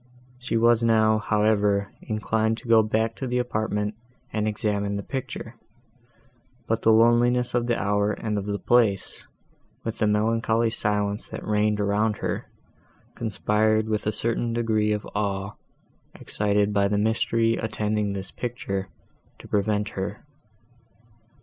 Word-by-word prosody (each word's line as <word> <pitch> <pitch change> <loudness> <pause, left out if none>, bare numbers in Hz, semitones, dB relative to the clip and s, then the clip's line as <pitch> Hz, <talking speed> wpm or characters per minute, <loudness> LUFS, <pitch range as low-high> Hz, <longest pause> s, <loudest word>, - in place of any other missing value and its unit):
She 125 -2 -1
was 115 0 +4
now, 110 -1 +4
however, 105 -2 +1
inclined 110 +1 0
to 120 - -11
go 115 -1 +6
back 110 +1 0
to 130 - -4
the 125 0 -1
apartment 110 -3 -1 0.4
and 110 -1 0
examine 100 -1 -1
the 100 - -3
picture; 130 -3 -5 1.1
but 115 0 -1
the - - +3
loneliness 120 +2 +4
of 120 -1 +1
the 120 - +1
hour 100 +1 +1
and 105 0 -3
of 100 - -6
the 100 0 -1
place, 105 -5 +1 0.6
with 115 0 -4
the 110 - +2
melancholy 115 +2 +1
silence 105 -1 -1
that - - -7
reigned 105 0 +1
around 105 +1 +1
her, - - -3 0.7
conspired 110 -1 +1
with 105 -1 -1
a - - +3
certain 115 +2 -1
degree 110 -2 +1
of 105 0 -2
awe, 100 -1 -2 0.6
excited 105 0 0
by 100 -1 +3
the 100 0 0
mystery 115 +1 +1
attending 105 -2 -1
this 95 -1 -5
picture, 100 -6 -4 0.5
to - - -13
prevent 105 0 0
her. 100 +2 -5
110 Hz, 140 wpm, -25 LUFS, 105-115 Hz, 1.1 s, go